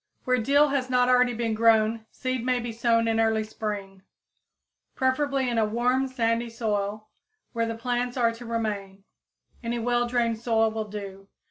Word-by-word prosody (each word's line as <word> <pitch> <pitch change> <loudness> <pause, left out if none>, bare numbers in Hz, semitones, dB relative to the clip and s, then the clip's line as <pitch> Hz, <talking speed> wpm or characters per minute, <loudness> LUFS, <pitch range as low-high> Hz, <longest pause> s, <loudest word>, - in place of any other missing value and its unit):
_ - - -42
Where 255 -1 +2
dill 285 +6 +4
has 270 -2 -1
not 250 0 +3
already 250 -1 +4
been 230 -1 -1
grown 220 0 +3
seed 255 -2 -3
may 250 0 +1
be 240 -1 -4
sown 230 0 +2
in 225 0 +1
early 220 -1 +2
spring, 205 -3 -6 0.9
preferably 265 0 +1
in 235 -2 0
a 220 - +3
warm 250 +4 +1
sandy 235 -2 0
soil, 215 -2 -3 0.4
where 230 -1 0
the 230 - -3
plants 245 +2 -2
are 235 -2 +3
to 230 +1 -10
remain. 205 -4 -3 0.6
Any 235 +1 -2
well 240 +1 +1
drained 235 -2 0
soil 225 -1 +2
will 220 -1 -4
do. 195 -1 -8
230 Hz, 170 wpm, -26 LUFS, 220-245 Hz, 0.9 s, dill